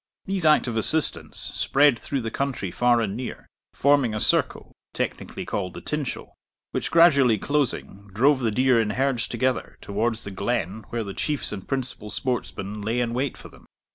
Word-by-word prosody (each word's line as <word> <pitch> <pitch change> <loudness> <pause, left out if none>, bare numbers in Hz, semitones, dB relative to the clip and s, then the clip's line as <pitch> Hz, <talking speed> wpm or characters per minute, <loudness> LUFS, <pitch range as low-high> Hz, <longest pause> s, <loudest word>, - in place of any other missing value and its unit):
These 190 -3 -2
active 125 -6 +3
assistants 155 +8 +2
spread 140 -3 +2
through 140 -2 -3
the 115 -1 -4
country 130 -9 -2
far 120 +2 +3
and 105 -3 -2
near, 125 +2 -6 0.3
forming 140 -5 +3
a - - -1
circle, - - +1 0.2
technically - - -4
called 90 -3 -3
the - - -7
tinchel, 150 -3 -4 0.4
which, - - -2
gradually 140 -9 +5
closing, 120 -7 -2
drove 130 +8 +3
the 120 -3 +1
deer 125 +1 +3
in 110 - -1
herds 130 -5 +1
together 125 +1 -1
towards 110 +3 -2
the 100 - -6
glen 100 0 -2
where 115 -1 -2
the 100 -2 -6
Chiefs 150 +7 -1
and 95 -3 -7
principal 130 -5 -4
sportsmen 105 -4 -3
lay 110 +4 -1
in 120 -1 0
wait 135 +3 -1
for - - -11
them. - - -19
120 Hz, 170 wpm, -25 LUFS, 105-140 Hz, 0.4 s, gradually